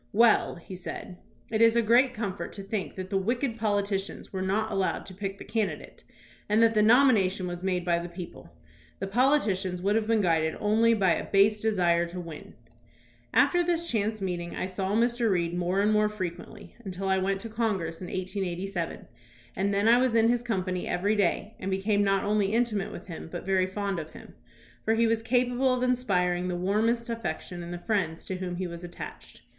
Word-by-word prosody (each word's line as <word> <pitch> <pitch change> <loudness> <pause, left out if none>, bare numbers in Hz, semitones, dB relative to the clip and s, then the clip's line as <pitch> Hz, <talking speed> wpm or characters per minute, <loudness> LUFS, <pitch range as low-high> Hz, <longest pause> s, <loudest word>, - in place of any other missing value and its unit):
"Well," 225 +1 +4
he 180 +2 -10
said, 180 0 -7 0.3
"it 220 0 +1
is 230 0 +6
a 235 - +4
great 245 +4 +4
comfort 205 -3 -4
to 195 - -7
think 195 -1 -4
that 185 0 -6
the 195 - +2
wicked 235 +3 -1
politicians 200 -3 -2
were 190 - -2
not 205 +4 0
allowed 195 -1 -1
to 190 - -10
pick 195 +1 -5
the - - -9
candidate 220 -4 -3 0.5
and 215 +2 +4
that 225 0 +4
the 215 - +3
nomination 215 -5 +4
was 175 -1 -5
made 180 -2 -1
by 170 -1 +2
the 175 +1 -6
people. 170 - -9 0.5
The 195 - -3
politicians 200 -5 +1
would 200 +3 +1
have 220 -1 +1
been 225 -1 +3
guided 160 -3 +1
only 225 +2 +3
by 190 -4 +3
a - - 0
base 205 +2 +4
desire 175 -6 +2
to 180 +2 -7
win." 165 -3 -9 0.8
After 355 - +4
this 340 -1 0
chance 215 -1 -1
meeting 175 -2 -3
I - - -2
saw 190 +1 -3
Mr. 235 0 +2
Reed 170 -3 0
more 180 +2 0
and 210 +1 +3
more 210 0 +3
frequently 185 -5 -7
until 195 -1 -4
I 190 0 +2
went 195 +1 0
to 230 - -6
Congress 200 -8 -2
in 180 - -5
1887, 185 -1 -4 0.5
and 195 +2 0
then 200 +2 +1
I 235 +2 +6
was 255 -2 +2
in 225 0 +5
his 240 0 +2
company 185 -6 -2
every 200 +5 +1
day 205 +2 0
and 190 - -4
became 200 +2 +1
not 195 -1 +2
only 205 -1 +1
intimate 225 -4 0
with - - -9
him, 165 -2 -8
but 175 - -6
very 190 -1 +2
fond 195 -1 -2
of 155 -1 -7
him; - - -12 0.5
for 225 - +2
he 230 +1 +3
was 225 0 +1
capable 245 +2 +2
of 255 0 0
inspiring 180 -8 +1
the 180 - -2
warmest 220 +6 +1
affection 230 -6 -4
in 170 - -7
the 175 - -4
friends 175 -4 -2
to 190 - -4
whom 180 -1 -4
he 185 +1 -3
was 170 0 -7
attached. 175 0 -9
195 Hz, 205 wpm, -28 LUFS, 180-225 Hz, 0.8 s, is